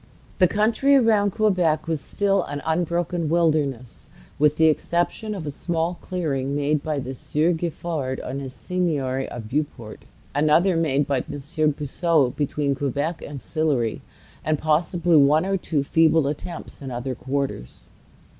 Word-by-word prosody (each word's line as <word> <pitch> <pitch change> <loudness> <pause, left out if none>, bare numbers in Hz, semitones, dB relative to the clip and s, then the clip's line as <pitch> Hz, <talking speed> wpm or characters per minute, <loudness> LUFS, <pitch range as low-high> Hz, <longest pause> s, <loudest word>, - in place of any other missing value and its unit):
The 185 - +6
country 225 +8 +3
around 220 -6 +4
Quebec 185 -8 +1
was 160 -3 -1
still 200 +2 +1
an 145 0 -5
unbroken 170 0 0
wilderness, 150 -7 0 0.3
with 150 +1 +3
the 160 - +5
exception 175 +7 0
of 175 -5 -6
a 145 - -3
small 170 +3 -2
clearing 140 -7 -2
made 145 +1 +1
by 155 -1 -2
the 130 -1 -4
Sieur 150 +6 0
Giffard 160 -5 -3
on 135 +2 -4
his 135 -2 -6
seigniory 135 -1 -2
of 115 -3 -7
Beauport, 130 -4 -4 0.3
another 155 +6 +3
made 145 -4 +1
by 140 -1 0
M. - - -6
de 155 +2 -1
Puiseaux 150 -1 +1
between 145 -1 0
Quebec 145 +4 -2
and 145 -1 -7
Sillery, 140 -8 -1 0.4
and 155 0 +1
possibly 165 +2 +2
one 150 +4 +5
or 195 0 0
two 160 -6 -1
feeble 160 +1 +3
attempts 150 +4 -6
in 135 - -6
other 125 +1 -3
quarters. 135 - -4
155 Hz, 150 wpm, -23 LUFS, 140-170 Hz, 0.4 s, The